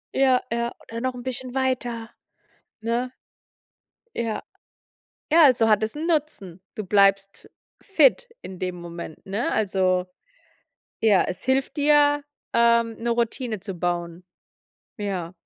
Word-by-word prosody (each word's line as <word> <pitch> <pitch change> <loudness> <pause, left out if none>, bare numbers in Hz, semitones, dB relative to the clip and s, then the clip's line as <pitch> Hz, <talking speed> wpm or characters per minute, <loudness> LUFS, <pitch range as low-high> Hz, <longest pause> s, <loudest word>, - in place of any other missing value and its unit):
Ja, 260 -2 +3
ja, 235 0 -2
oder 230 +1 -7
noch 255 0 -2
'n 245 - -8
bisschen 255 0 -6
weiter, 245 -3 -2 0.7
ne? 240 +2 -1 1.0
Ja. 225 -2 -2 0.9
Ja, 325 +2 +6
also 250 -5 +5
hat 215 -1 +3
es 220 +4 -2
'n 320 +2 -3
Nutzen. 290 - -2
Du 215 - -5
bleibst 195 0 +2 0.3
fit 285 - +3
in 185 0 -9
dem 180 0 -3
Moment, 170 -2 -9
ne? 200 +5 -2
Also, 185 -3 +1 0.9
ja, 210 -4 +4
es 180 - -6
hilft 265 +2 0
dir, 290 0 +4 0.3
ähm, 235 -1 +3
'ne 235 +1 -2
Routine 235 -1 -1
zu 195 0 -6
bauen. 175 0 -3 0.8
Ja, 190 -5 -3
230 Hz, 130 wpm, -24 LUFS, 195-255 Hz, 1.0 s, Ja